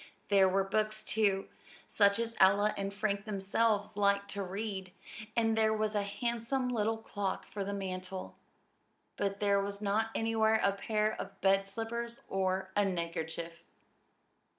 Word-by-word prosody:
There 195 Hz, -2 st, +6 dB
were 195 Hz, +1 st, +2 dB
books, 215 Hz, +2 st, 0 dB
too, 200 Hz, -3 st, +1 dB, 0.4 s
such 200 Hz, -1 st, +4 dB
as 230 Hz, 0 st, -2 dB
Ella 200 Hz, +2 st, +5 dB
and 195 Hz, 0 st, -3 dB
Frank 200 Hz, 0 st, -1 dB
themselves 205 Hz, +1 st, 0 dB
liked 200 Hz, 0 st, +2 dB
to 200 Hz, -, -3 dB
read; 195 Hz, -1 st, -4 dB, 0.4 s
and 225 Hz, -1 st, +2 dB
there 220 Hz, 0 st, +3 dB
was 215 Hz, 0 st, 0 dB
a 205 Hz, -, +1 dB
handsome 235 Hz, +5 st, -2 dB
little 225 Hz, -2 st, 0 dB
clock 205 Hz, -3 st, -3 dB
for 200 Hz, -, -4 dB
the 200 Hz, -, -3 dB
mantel 185 Hz, -1 st, -5 dB, 0.8 s
but 200 Hz, 0 st, -2 dB
there 200 Hz, -1 st, +3 dB
was 200 Hz, 0 st, -4 dB
not 210 Hz, +2 st, +1 dB
anywhere 220 Hz, -1 st, +2 dB
a 200 Hz, -, +4 dB
pair 215 Hz, +2 st, 0 dB
of -, -, -9 dB
bed 195 Hz, 0 st, +3 dB
slippers 230 Hz, +3 st, -4 dB
or 190 Hz, 0 st, -1 dB
a 205 Hz, -, +4 dB
neckerchief. 170 Hz, -2 st, -3 dB
200 Hz, 150 wpm, -32 LUFS, 195-220 Hz, 0.8 s, There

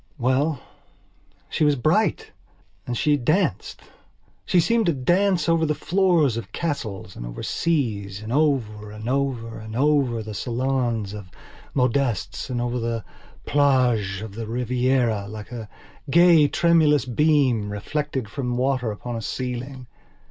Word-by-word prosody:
Well, 135 Hz, +3 st, +1 dB, 0.9 s
she -, -, -1 dB
was 150 Hz, -1 st, +4 dB
bright; 160 Hz, -, +1 dB, 0.6 s
and 120 Hz, -1 st, -2 dB
she 150 Hz, +3 st, +2 dB
danced. 155 Hz, +9 st, 0 dB, 0.6 s
She 185 Hz, -, +3 dB
seemed 230 Hz, +5 st, +2 dB
to 170 Hz, -, +3 dB
dance 175 Hz, +6 st, +2 dB
over 165 Hz, -1 st, +3 dB
the 150 Hz, -1 st, +1 dB
floors 170 Hz, -, +2 dB
of 115 Hz, -, -6 dB
castles 115 Hz, -, -4 dB
and -, -, -7 dB
over -, -, -7 dB
seas 110 Hz, -, -1 dB
and 110 Hz, +2 st, -5 dB
over 120 Hz, -8 st, 0 dB
and 105 Hz, +2 st, -8 dB
over 125 Hz, -4 st, -2 dB
and 110 Hz, 0 st, -8 dB
over 135 Hz, -4 st, +2 dB
the 110 Hz, 0 st, -7 dB
salons 120 Hz, -3 st, -1 dB
of 100 Hz, -3 st, -8 dB, 0.5 s
modistes 125 Hz, -5 st, 0 dB
and 125 Hz, -1 st, -2 dB
over 120 Hz, +1 st, -1 dB
the 115 Hz, -1 st, -3 dB, 0.4 s
plages 125 Hz, -9 st, +2 dB
of 110 Hz, -3 st, -8 dB
the 115 Hz, +1 st, -6 dB
Rivieralike 120 Hz, -3 st, -1 dB
a 115 Hz, -3 st, -7 dB, 0.4 s
gay 170 Hz, -1 st, +6 dB
tremulous 155 Hz, -4 st, +3 dB
beam, 130 Hz, -5 st, +2 dB
reflected 135 Hz, +4 st, -3 dB
from 125 Hz, 0 st, -3 dB
water 130 Hz, -2 st, 0 dB
upon 120 Hz, +3 st, -5 dB
a 115 Hz, -, -4 dB
ceiling. 125 Hz, +2 st, -5 dB
125 Hz, 135 wpm, -23 LUFS, 115-150 Hz, 0.9 s, gay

